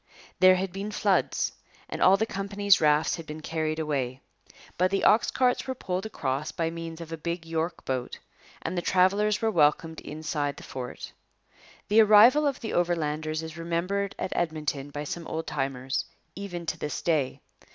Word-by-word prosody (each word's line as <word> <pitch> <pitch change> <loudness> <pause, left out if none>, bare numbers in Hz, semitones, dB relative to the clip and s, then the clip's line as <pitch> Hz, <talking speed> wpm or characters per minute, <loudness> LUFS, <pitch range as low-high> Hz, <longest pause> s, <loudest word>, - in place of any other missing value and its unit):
There 185 0 +7
had 185 0 -2
been 195 +2 -4
floods 210 - +1 0.4
and - - -6
all 190 +1 +6
the 220 - +1
company's 200 -1 +2
rafts 150 +2 +3
had 165 -2 -9
been 155 +1 -7
carried 155 0 -2
away. 135 -5 -2 0.6
But 185 +1 +2
the 195 0 0
ox 215 - +5
carts 250 0 +1
were 260 - -2
poled 185 -4 -3
across 140 -6 -3
by 165 -2 -2
means 165 0 -7
of 165 -1 -9
a 165 - -4
big 170 +1 -4
York 165 +1 -3
boat; 130 -2 -3 0.5
and 165 - -3
the 175 - 0
travellers 200 +4 +2
were 220 - +3
welcomed 160 -1 +2
inside 150 -2 -3
the - - -10
fort. 125 -2 -7 0.8
The 215 +2 +6
arrival 225 +8 +7
of 275 - -2
the 225 - -4
Overlanders 155 -2 0
is 160 +1 -8
remembered 180 +4 -1
at - - -3
Edmonton 150 -4 -2
by 145 +1 -5
some 165 +3 -5
old 160 0 -3
timers 135 -2 -2 0.3
even 180 -3 -6
to - - -3
this 150 - -4
day. 150 -6 0
165 Hz, 175 wpm, -27 LUFS, 155-195 Hz, 0.8 s, There